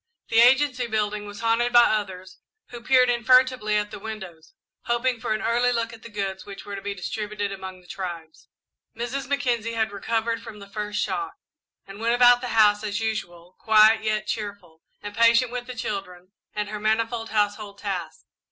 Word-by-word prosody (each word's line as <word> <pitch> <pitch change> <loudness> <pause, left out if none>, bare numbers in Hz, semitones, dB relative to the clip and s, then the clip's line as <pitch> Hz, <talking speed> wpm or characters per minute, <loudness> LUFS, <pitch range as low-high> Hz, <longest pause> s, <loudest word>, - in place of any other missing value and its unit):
The 225 - +3
Agency 255 0 +4
building 210 -1 -2
was 205 +1 -9
haunted 230 +1 +2
by 240 0 +8
others, 190 -4 -2 0.3
who 240 -1 -9
peered 255 +2 +4
in 240 -1 0
furtively 255 -3 +4
at 210 0 0
the - - -7
windows, 195 - -9 0.3
hoping 240 0 0
for 220 - -4
an 215 - -5
early 240 +2 +2
look 230 -1 -2
at 225 - -12
the 230 - -11
goods 195 -2 -4
which 200 -1 -10
were 205 - -6
to 195 - -6
be 200 0 -4
distributed 205 +2 -4
among 190 -1 -8
the 180 - -22
tribes. 170 -5 -7 0.5
Mrs. 245 +4 -3
Mackenzie 245 -5 -1
had 220 -2 0
recovered 225 +3 -2
from 215 - -10
the 200 - -11
first 210 +1 -4
shock 395 - -3 0.5
and 195 +1 -11
went 230 +1 +1
about 245 0 +6
the 250 - -4
house 210 -1 +5
as 210 0 -2
usual, 180 -6 -4
quiet 220 0 +5
yet 215 -1 0
cheerful, 200 -7 -6 0.2
and 205 0 -6
patient 230 +1 +4
with 245 0 -5
the 255 - -7
children 195 -5 -5 0.2
and 210 -1 -2
her 210 0 -5
manifold 225 +2 0
household 205 -1 -1
tasks. 200 - -5
215 Hz, 190 wpm, -24 LUFS, 200-235 Hz, 0.5 s, by